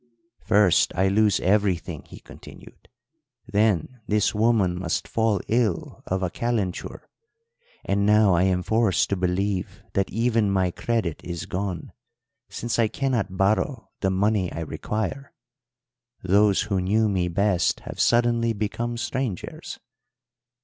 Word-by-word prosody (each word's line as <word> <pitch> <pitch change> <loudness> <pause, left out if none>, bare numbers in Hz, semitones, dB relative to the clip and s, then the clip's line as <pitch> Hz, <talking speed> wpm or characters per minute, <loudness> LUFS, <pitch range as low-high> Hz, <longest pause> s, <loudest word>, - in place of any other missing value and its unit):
"'First 105 -5 +3
I 95 +1 +2
lose 105 0 +3
everything,' 95 -2 0
he - - -12
continued, - - -14 0.6
'then 105 +2 0
this 105 0 +1
woman 105 -5 +2
must 85 -2 -2
fall 110 -3 +1
ill 110 -6 -1
of 95 +1 -1
a 90 - -1
calenture; 105 -3 -3 0.8
and 100 0 +1
now 105 -1 +5
I 85 - +3
am 90 -1 +1
forced 110 -2 +2
to - - +2
believe 90 +1 -2
that 95 0 0
even 115 -1 +1
my 95 -2 +1
credit 100 -4 -2
is 85 -2 -5
gone, 90 -3 -4 0.6
since 120 0 -3
I 115 - +4
cannot 110 -5 -2
borrow 110 +6 0
the 95 - +1
money 95 0 +1
I 80 - -5
require. 110 - -4 0.9
Those 100 +2 +3
who 100 -3 -1
knew 105 +4 +2
me 95 -3 0
best 95 +1 +1
have - - -9
suddenly 120 -1 +2
become 115 +3 -3
strangers.' 115 -3 -4
100 Hz, 130 wpm, -24 LUFS, 95-110 Hz, 0.9 s, now